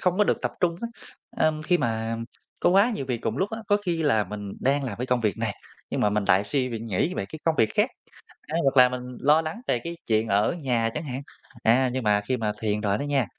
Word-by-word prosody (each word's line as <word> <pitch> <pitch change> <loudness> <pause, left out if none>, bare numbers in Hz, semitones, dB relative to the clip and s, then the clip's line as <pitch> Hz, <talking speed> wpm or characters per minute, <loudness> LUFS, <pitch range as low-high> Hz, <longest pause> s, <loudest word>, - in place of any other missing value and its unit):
không 180 +1 +1
có 210 - +5
được - - +1
tập - - -1
trung 170 -1 +2
á. 235 - -2 0.6
Ưm, 155 -1 +1
khi 175 +2 +2
mà 115 -3 -1 0.4
có - - +4
quá 200 +6 +5
nhiều 135 -9 -4
việc 125 -3 -1
cùng 110 - -1
một - - -5
lúc 195 - 0
á, 220 - -4
có 205 - +5
khi 165 -2 0
là 110 -8 +3
mình 100 +1 -6
đang 140 +1 +1
làm 110 -6 -4
cái 125 - -2
công 125 -1 +1
việc 105 -4 0
này, - - -1 0.4
nhưng - - -1
mà 105 - +3
mình 105 -1 0
lại 95 +2 +4
suy 130 +2 0
nghĩ 115 - -1
về 95 - -2
cái 155 - -8
công 165 -1 +3
việc 110 - +5
khác, - - +3 0.6
a, 155 - -3
hoặc 135 0 +2
là 125 0 +8
mình 125 0 -4 0.2
lo 150 +3 +4
lắng 160 +9 -5
về 120 - +1
cái 170 +3 -6
chuyện 110 0 +2
ở 100 - +2
nhà 120 -4 +1
chẳng 155 - -3
hạn. 135 -1 -4 0.4
À, 125 +3 +4
nhưng 130 -2 -2
mà 105 -1 +3
khi 125 +5 -1
mà 105 -2 -1
thiền 105 -1 0
rồi 100 -1 +1
đó - - -4
nha, 140 -4 +1
125 Hz, 270 wpm, -26 LUFS, 110-155 Hz, 0.6 s, là